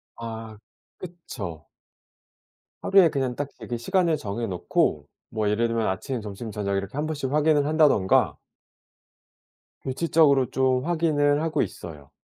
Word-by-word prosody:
아. 110 -2 -7 0.4
그쵸. 115 - -8 1.1
하루에 190 -4 +5
그냥 130 -4 -2
딱 145 -1 -4
되게 120 - -5
시간을 165 +5 +1
정해 110 +2 -4
놓고 75 -5 0 0.2
뭐 110 -1 -1
예를 115 +3 +1
들면 115 -1 -1
아침, 115 +6 -3
점심, 105 +2 -7
저녁 100 -1 -2
이렇게 100 +6 -5
1 150 - -1
번씩 145 -4 -3
확인을 150 -1 +3
한다든가. 150 -11 +3 1.5
규칙적으로 140 -1 +2
좀 130 +1 +1
확인을 155 -4 +2
하고 155 -2 0
있어요. 75 -5 -7
130 Hz, 270 characters per minute, -25 LUFS, 105-155 Hz, 1.5 s, 하루에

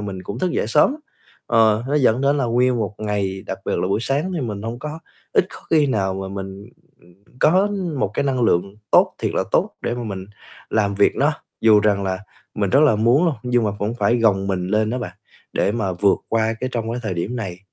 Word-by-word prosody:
mình 100 -3 -5
cũng 100 +4 -6
thức 185 - 0
dậy - - 0
sớm 150 - +4
lắm. 305 - -10 0.5
Ờ, 110 -1 +3
nó 145 - 0
dẫn 125 -3 +3
đến 140 +1 +2
là 135 - 0
nguyên 125 +1 +2
một 105 -2 -2
ngày, 100 -3 -2
đặc - - -4
biệt - - -1
là 90 - -1
buổi 100 - 0
sáng 145 +9 -1
thì 160 - -2
mình 105 -5 -4
hông 115 +2 -5
có 150 +3 -6 0.3
ít 185 - +3
có - - -11
khi 155 -3 +4
nào 95 -7 0
mà 95 0 -5
mình, 95 +1 -7 0.3
ừm, 85 0 -21 0.3
có 185 +6 +4 0.3
một 95 - 0
cái - - +1
năng 130 -3 0
lượng 100 -1 +1
tốt - - +4
thiệt - - -2
là - - +1
tốt - - +2
để - - -1
mà 120 - -5
mình 95 -3 -5 0.5
làm 100 -2 +1
việc 100 0 +3
nó 145 +3 +2 0.3
dù 110 -2 +6
rằng 100 -2 +2
là 95 -1 -1 0.4
mình 100 -3 -1
rất 140 - +5
là 140 -8 +5
muốn 120 +10 +3
luôn, 160 - +1
nhưng 125 -2 +1
mà 105 - +1
cũng 105 +3 -2
phải 120 0 +2
gồng 100 -4 +2
mình 90 -2 -1
lên 110 +1 +1
đó 125 - -2
bạn, 120 - -5 0.4
để 100 - +1
mà 105 -5 -1
vượt 95 +2 +2
qua 115 0 +1
cái 130 - -1
trong 115 -1 -2
cái 125 - -3
thời 95 -4 -2
điểm 100 +9 -3
này, 95 -6 -5
110 Hz, 245 wpm, -21 LUFS, 100-125 Hz, 0.5 s, dù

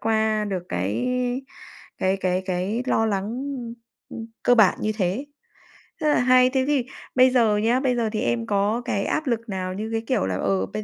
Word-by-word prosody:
qua 220 -1 +1
được 190 -4 -3
cái 95 - -2 0.9
cái 190 +1 +1
cái 185 -1 -1
cái 190 +5 -1
lo 225 -3 +2
lắng, 195 -3 -1 0.3
ưm, 235 -1 -7 0.3
ưm, 225 - -7 0.2
cơ 245 - +5
bản 215 -5 +4
như 215 - 0
thế, 195 +9 -1 0.8
rất 305 - +1
là 295 - +3
hay. 255 0 +5
Thế 260 0 +1
thì 280 -5 +1 0.3
bây 255 0 +6
giờ 230 -5 +3
nhá, 230 +4 +2
bây 260 -2 +1
giờ 230 -2 0
thì 215 - -1
em 120 -1 0
có 205 +4 +1
cái 200 -5 -1
áp 310 -1 -1
lực 230 -2 -2
nào 185 -2 -3
như, 215 +3 -4
cái 225 0 -1
kiểu, - - +1
là, 95 -1 -2
ờ, 95 0 0
bây 215 - -6
215 Hz, 205 wpm, -24 LUFS, 190-245 Hz, 0.9 s, bây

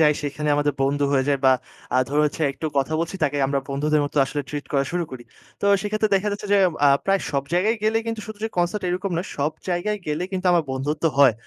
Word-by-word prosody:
যাই 150 -1 +6
সেইখানে 150 +1 -3
আমাদের 145 0 +1
বন্ধু 140 +1 +1
হয়ে 135 -1 +3
যায়, 140 -1 +2
বা 130 - +7 0.4
আ - - +4
ধরুন 150 +2 +2
হচ্ছে 155 - -4
একটু 160 - -5
কথা 135 +3 0
বলছি, 170 +3 -3
তাকে 145 0 0
আমরা 140 0 0
বন্ধুদের 150 +2 +1
মতো 145 - -6
আসলে 145 +1 -3
ট্রিট 145 0 -5
করা 140 -1 +2
শুরু 175 -1 0
করি। 130 -2 -8 0.4
তো - - -3 0.2
সেইক্ষেত্রে 215 +1 0
দেখা 200 +2 +1
যাচ্ছে, 205 +1 -5
যে, - - +5 0.3
আ - - +7 0.2
প্রায় 195 0 +2
সব 140 -2 0
জায়গায় 215 +6 +2
গেলে, 220 +1 +2
কিন্তু 225 -1 -3
শুধু 215 -1 -8
যে, 225 - 0
কনসার্ট 175 +3 0
এরকম 185 +2 -2
নয়, 175 - -3
সব 150 +3 +1 0.2
জায়গায় 200 +4 -1
গেলে 150 +3 -1
কিন্তু 185 0 -2
আমার 170 -3 +3
বন্ধুত্ব 145 +5 -2
হয়। 135 -4 +7
155 Hz, 235 wpm, -23 LUFS, 140-195 Hz, 0.4 s, বা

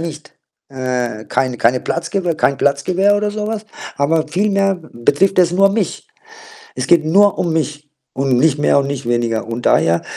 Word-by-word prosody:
nicht, 155 -2 -8 0.3
äh, 125 -4 -3
kein 130 -2 -1
keinen 125 +2 +1
Platz 165 0 -3
gebe, 180 -4 -1
kein 140 -2 +1
Platz 140 0 0
gewähre 195 +3 +2
oder 210 0 -1
so 210 0 -4
was, 220 -1 -4 0.3
aber 155 +3 +1
vielmehr 195 +2 +1 0.2
betrifft 145 +12 +1
es 175 -2 +4
nur 195 +2 +4
mich. 205 - -3 0.7
Es - - -3
geht 170 -2 +4
nur 200 +6 +3
um 170 - -1
mich 150 -2 -3 0.2
und 135 -2 +1
nicht 145 +1 +2
mehr 145 -1 +3
und 140 - 0
nicht 140 -3 -5
weniger 120 -2 -1
und 115 +1 -5
daher 85 +1 +2
155 Hz, 185 wpm, -17 LUFS, 130-195 Hz, 0.7 s, es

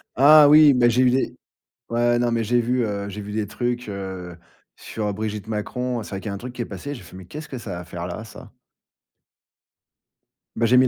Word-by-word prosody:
Ah 150 +3 +8
oui, 150 -1 +8
mais 120 -1 +4
j'ai 125 +2 +2
eu 125 - +5
des 130 -1 -1 0.5
ouais 120 +1 +2
non 120 -1 +1
mais 115 -1 0
j'ai 120 +3 +2
vu, 125 +1 0
heu, 100 -1 -3
j'ai 105 +1 -6
vu 105 +1 -7
des 105 -1 -1
trucs, 120 +1 -3
heu, 95 -3 -6 0.4
sur 105 -2 -4
Brigitte 105 0 -4
Macron, 120 +2 -3
c'est - - -11
vrai 95 - -4
qu'il - - -8
y - - -3
a - - -4
un 100 - -4
truc 125 +3 -8
qui 125 - -5
est - - -2
passé, 125 +9 -6
j'ai - - -10
fait: - - -14
«Mais 95 - -10
qu'est-ce 150 - -9
que 130 - -6
ça 90 -7 -6
à - - -7
faire 85 0 -6
là 95 +5 -6
ça?» 110 - -12 2.0
Bah 115 - +1
j'ai 125 +2 +5
mis 130 - +6
j'ai - - +3
115 Hz, 245 wpm, -23 LUFS, 100-125 Hz, 2.0 s, Ah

